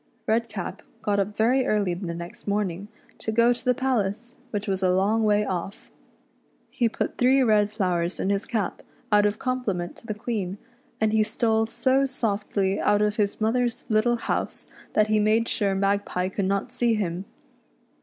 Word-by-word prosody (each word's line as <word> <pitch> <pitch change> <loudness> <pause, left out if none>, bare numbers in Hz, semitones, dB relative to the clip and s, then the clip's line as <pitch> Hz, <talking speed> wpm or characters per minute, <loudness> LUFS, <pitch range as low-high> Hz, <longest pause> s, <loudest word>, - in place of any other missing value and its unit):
Redcap 230 +1 -2 0.2
got 205 -1 +1
up 200 +1 -1
very 250 +4 +3
early 205 -6 +1
the 175 -1 -4
next 170 +3 -9
morning 200 -2 -1 0.3
to 220 - -3
go 235 +2 +4
to 240 - -9
the 250 -1 +2
palace, 240 -3 -1 0.2
which 210 -2 -3
was 190 -1 -1
a 185 - +3
long 200 +5 +2
way 210 -1 +3
off. 190 +1 -5 0.8
He 235 -3 +1
put - - -3
three 260 +2 +5
red 210 -3 +3
flowers 180 -4 -1
in 195 - 0
his 200 +1 -1
cap 215 -6 -2 0.3
out 210 0 +5
of 205 +1 -2
compliment 220 -10 -2
to 230 - -13
the 215 - -3
Queen, 205 -4 -3 0.4
and 220 0 +2
he 220 - +4
stole 220 0 +1
so 265 +4 +2
softly 205 -6 -1
out 205 0 +3
of 210 0 0
his 205 -2 0
mother's 235 +2 0
little 220 +2 +3
house, 235 - -3 0.3
that 215 0 +3
he 215 0 +3
made 220 +2 +3
sure 200 -2 0
Magpie 195 -2 0
could 195 0 -2
not 200 +5 -1
see 240 -2 +1
him. 185 -3 -2
210 Hz, 175 wpm, -25 LUFS, 195-230 Hz, 0.8 s, three